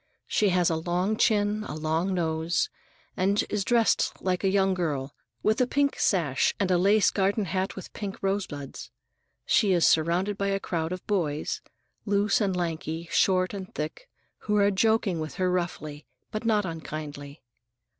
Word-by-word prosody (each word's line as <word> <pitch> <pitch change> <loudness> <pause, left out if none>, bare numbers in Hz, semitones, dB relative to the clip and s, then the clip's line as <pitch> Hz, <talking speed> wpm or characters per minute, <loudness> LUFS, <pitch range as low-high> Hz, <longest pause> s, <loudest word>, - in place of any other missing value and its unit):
She 210 - +2
has 180 -2 +2
a 160 - 0
long 180 +5 0
chin, 215 -2 +2
a - - -5
long 160 +4 -1
nose, 165 - 0 0.4
and 195 +2 +1
she - - +2
is 210 -2 0
dressed 235 +1 +2
like 185 0 -1
a 195 - +3
young 195 0 +3
girl, 150 -6 -2 0.3
with 215 +4 +2
a 250 - +3
pink 280 +1 +1
sash 160 -9 +2
and 195 -2 +1
a 180 - +4
lace 200 +3 +4
garden 200 +1 +1
hat 185 +2 -2
with 190 - -9
pink 200 -3 -5
rosebuds. 145 -11 -3 0.6
She 200 -3 +3
is 175 -2 +4
surrounded 175 +6 +2
by 200 - 0
a 195 0 0
crowd 165 -3 -2
of 185 0 -5
boys,—loose 200 +4 -1
and 195 -3 +1
lanky, 165 -1 -3
short 185 0 +2
and 190 -2 -6
thick,—who 210 - -5
are 200 0 +4
joking 205 -3 +2
with 155 -1 -5
her 185 -1 +1
roughly, 155 -5 -3 0.2
but 215 +2 -4
not 210 -3 +2
unkindly. 150 -3 -7
185 Hz, 165 wpm, -27 LUFS, 160-205 Hz, 0.6 s, a